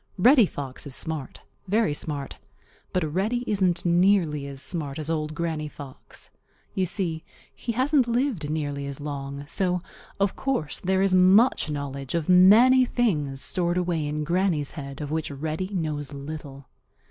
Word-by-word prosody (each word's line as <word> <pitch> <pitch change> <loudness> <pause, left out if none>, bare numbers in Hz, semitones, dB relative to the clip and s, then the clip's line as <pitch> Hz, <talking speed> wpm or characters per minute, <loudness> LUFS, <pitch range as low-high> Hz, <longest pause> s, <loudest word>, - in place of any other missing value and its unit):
Reddy 240 +2 +6
Fox 140 -1 -6
is 135 - -4
smart, 155 -5 -4 0.2
very 205 -5 +2
smart. 145 -2 -4 0.5
But 160 -5 -1
Reddy 220 +7 0
isn't 185 -6 +2
nearly 175 -5 +3
as 140 -1 -7
smart 145 -2 -3
as 155 +1 -3
Old 155 -1 -2
Granny 160 -2 -2
Fox. 145 -3 -10 0.4
You 185 -1 0
see, 170 -3 -1 0.3
he 235 - -4
hasn't 260 +1 +2
lived 235 - 0
nearly 145 -2 -3
as 140 0 -6
long, 140 -1 -5
so 180 +4 0 0.4
of 200 -1 +1
course 260 - -2
there 190 +1 +1
is 195 -1 +2
much 185 +2 +5
knowledge 140 -1 -4
of 165 -3 -1
many 220 +9 +7
things 150 - 0
stored 175 -1 0
away 170 -4 -1
in 150 +1 -2
Granny's 170 -3 0
head 140 -2 -8
of 145 -1 -5
which 160 0 -2
Reddy 155 +5 -3
knows 155 -6 -3
little. 140 -1 -8
160 Hz, 155 wpm, -25 LUFS, 145-190 Hz, 0.5 s, many